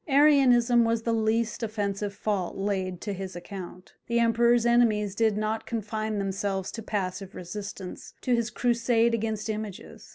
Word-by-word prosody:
Arianism 265 -5 +5
was 230 0 0
the 230 - 0
least 225 +1 0
offensive 205 -2 -2
fault 200 -3 -2
laid 190 -2 -2
to 205 - -3
his 190 -1 -6
account. 180 0 -9
The 235 - 0
Emperor's 235 +1 +3
enemies 220 -4 +3
did 220 0 +2
not 215 +1 -2
confine 215 -1 -3
themselves 195 -1 -2
to 225 - -6
passive 195 -3 -3
resistance 195 +5 -7
to 250 - +1
his 235 -1 +1
crusade 235 0 +2
against 220 -1 -2
images. 215 +1 -6
215 Hz, 150 wpm, -27 LUFS, 200-235 Hz, -, Arianism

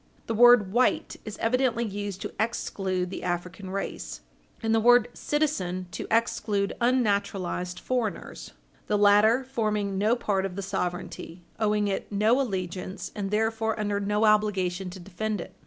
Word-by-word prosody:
The 230 - -2
word 235 -4 +6
white 250 +2 +1
is 215 -1 -6
evidently 235 0 +1
used 205 -2 -5
to - - -5
exclude 190 -5 -1
the - - -5
African 180 +2 -4
race, 195 +1 -5 0.4
and 225 0 +1
the 225 - +4
word 245 +1 +5
"citizen" 190 -13 -1
to - - -5
exclude 210 -3 +1
unnaturalized 200 -7 0
foreigners, 245 -5 -3 0.3
the 210 - +2
latter 210 +5 +5
forming 215 -6 -1
no 215 +4 +3
part 200 -5 0
of 190 -2 -4
the 200 - -4
sovereignty, 180 -2 -4 0.2
owing 210 -1 +2
it 195 +1 -3
no 215 +6 +3
allegiance, 185 -4 -4
and 200 -2 -3
therefore 220 +1 0
under 205 -1 0
no 210 +2 +1
obligation 195 -4 +2
to 185 +1 -9
defend 200 +3 -3
it. - - -8
205 Hz, 150 wpm, -27 LUFS, 190-225 Hz, 0.4 s, word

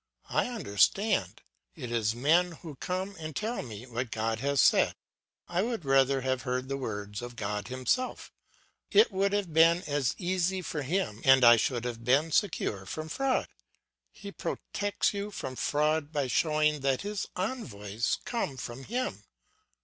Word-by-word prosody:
I - - +2
understand; 200 - +1 0.3
it 125 -8 -6
is 110 -2 +1
men 165 +8 +3
who 160 -3 -7
come 185 +5 -3
and 155 -2 -6
tell 225 +3 -2
me 115 -1 -8
what 120 0 -4
God 110 0 -1
has 140 +2 0
said. - - +5 0.5
I 175 +1 0
would 225 -6 -2
rather 135 0 +3
have 130 -1 -1
heard 130 0 -2
the 135 - -1
words 105 -5 -5
of 120 0 -7
God 105 -2 -3
himself; 130 - -1 0.6
it 420 - +5
would 195 +1 +1
have 200 -5 -1
been 165 +3 +5
as 145 -3 0
easy 185 0 0
for 155 -3 -3
him 145 - -2
and 135 -1 +6
I 120 0 +9
should 120 +1 -1
have 115 -1 -4
been 140 +7 +3
secure 110 - 0
from 155 +9 -5
fraud. 270 - 0 0.6
He 200 - -9
protects 205 +1 -2
you 200 +1 -3
from 130 -10 -6
fraud 150 +2 0
by 145 -3 0
showing 150 +2 +2
that 135 -1 0
his 205 0 -3
envoys 115 - -2
come 230 - -2
from 120 +2 -7
him. 205 - -3
145 Hz, 160 wpm, -29 LUFS, 120-185 Hz, 0.6 s, I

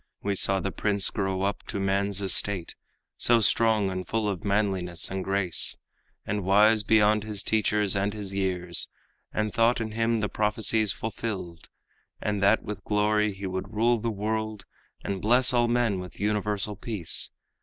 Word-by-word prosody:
We 100 - 0
saw 95 0 +4
the 95 - -3
prince 100 -1 +1
grow 95 -1 -2
up 100 +1 -1
to - - -4
man's 100 +1 0
estate, 95 -1 0 0.4
So 120 -1 +4
strong 110 -2 +3
and 95 0 -5
full 110 -1 -1
of 100 0 -3
manliness 95 -5 -1
and 95 0 -3
grace, 95 -3 0 0.5
And 105 -1 -2
wise 105 +3 +5
beyond 105 0 +3
his 105 -2 -3
teachers 105 -2 +1
and 100 +1 0
his 100 -2 -7
years, 90 -3 -1 0.4
And 110 -1 -2
thought 115 +1 +3
in 110 -1 -4
him 115 +1 0
the 105 - 0
prophecies 105 0 +1
fulfilled, 95 -7 -6 0.5
And 105 -1 -2
that 100 +3 +3
with 105 -2 -7
glory 105 0 +1
he 95 +1 -7
would 95 +3 -5
rule 120 +2 +2
the 115 +2 -2
world 110 0 -3 0.4
And 100 -2 -3
bless 125 +3 +4
all 120 -1 +3
men 120 -5 +1
with 90 0 -9
universal 105 0 -1
peace. 100 -5 -1
105 Hz, 165 wpm, -26 LUFS, 95-110 Hz, 0.5 s, wise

